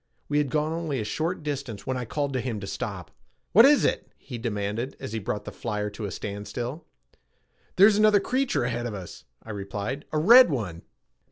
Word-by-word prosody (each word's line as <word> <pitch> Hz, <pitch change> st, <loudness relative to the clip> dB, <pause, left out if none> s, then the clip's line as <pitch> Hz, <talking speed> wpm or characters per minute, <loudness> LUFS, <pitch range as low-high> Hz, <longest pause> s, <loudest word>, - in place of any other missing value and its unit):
We 145 Hz, 0 st, +1 dB
had 145 Hz, -2 st, 0 dB
gone 155 Hz, +3 st, 0 dB
only 165 Hz, -5 st, -2 dB
a -, -, -1 dB
short 160 Hz, -, -2 dB
distance 140 Hz, -7 st, -4 dB
when 130 Hz, -, -1 dB
I 125 Hz, -1 st, -3 dB
called 140 Hz, +3 st, -2 dB
to 130 Hz, -, 0 dB
him 115 Hz, -3 st, -3 dB
to -, -, -5 dB
stop. -, -, -5 dB, 0.4 s
"What 225 Hz, +6 st, +8 dB
is 290 Hz, +1 st, +5 dB
it?" -, -, -1 dB
he 125 Hz, -4 st, -8 dB
demanded 110 Hz, +2 st, -3 dB
as -, -, -6 dB
he 110 Hz, -, -1 dB
brought 105 Hz, 0 st, -4 dB
the -, -, -6 dB
flyer 105 Hz, -2 st, -3 dB
to 105 Hz, +1 st, -6 dB
a -, -, -3 dB
standstill. 105 Hz, -, -5 dB, 0.9 s
"There's 200 Hz, +2 st, +6 dB
another 215 Hz, -1 st, +5 dB
creature 255 Hz, -, 0 dB
ahead 120 Hz, 0 st, -2 dB
of 110 Hz, -, -5 dB
us," 90 Hz, -8 st, -9 dB, 0.2 s
I 110 Hz, -, -8 dB
replied. 105 Hz, +7 st, -4 dB
"A 155 Hz, -, 0 dB
red 235 Hz, +10 st, +8 dB
one." 100 Hz, -, -3 dB
125 Hz, 200 wpm, -26 LUFS, 105-155 Hz, 0.9 s, What